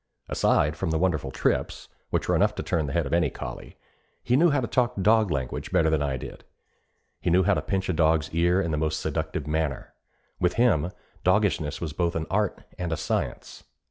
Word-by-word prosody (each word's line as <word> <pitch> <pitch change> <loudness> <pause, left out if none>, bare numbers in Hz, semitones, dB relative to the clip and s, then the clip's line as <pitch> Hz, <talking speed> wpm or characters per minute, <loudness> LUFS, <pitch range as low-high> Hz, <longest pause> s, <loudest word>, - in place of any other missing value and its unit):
Aside 75 +1 +2
from 85 +3 -2
the 80 - +1
wonderful 80 -6 0
trips, - - -1 0.2
which - - -1
were - - +2
enough - - +2
to - - -4
turn 80 -3 0
the 70 - -4
head 85 -3 +1
of 70 - -4
any 85 +1 +3
collie, - - -8 0.5
he 125 - +2
knew 170 +5 +5
how 145 -2 +2
to 125 - -1
talk 125 +1 +1
dog 110 +1 +4
language 65 -5 -3
better 80 -1 +3
than 80 -2 +1
I 70 -2 -1
did. - - -9 0.8
He - - -1
knew 90 +2 +4
how 100 +3 +3
to - - 0
pinch 95 -1 -2
a 95 - 0
dog's 80 -1 +2
ear 85 +2 +3
in 85 -4 -1
the 75 - 0
most 80 +1 -1
seductive 80 -2 -3
manner. 75 -2 -2 0.5
With 90 -1 +2
him, 90 -9 +2 0.3
doggishness 90 -6 +1
was 80 -4 -4
both 85 +1 -1
an 80 -1 -1
art 105 0 0 0.2
and 90 -2 -2
a 80 - -1
science. - - -3
85 Hz, 210 wpm, -26 LUFS, 75-95 Hz, 0.8 s, knew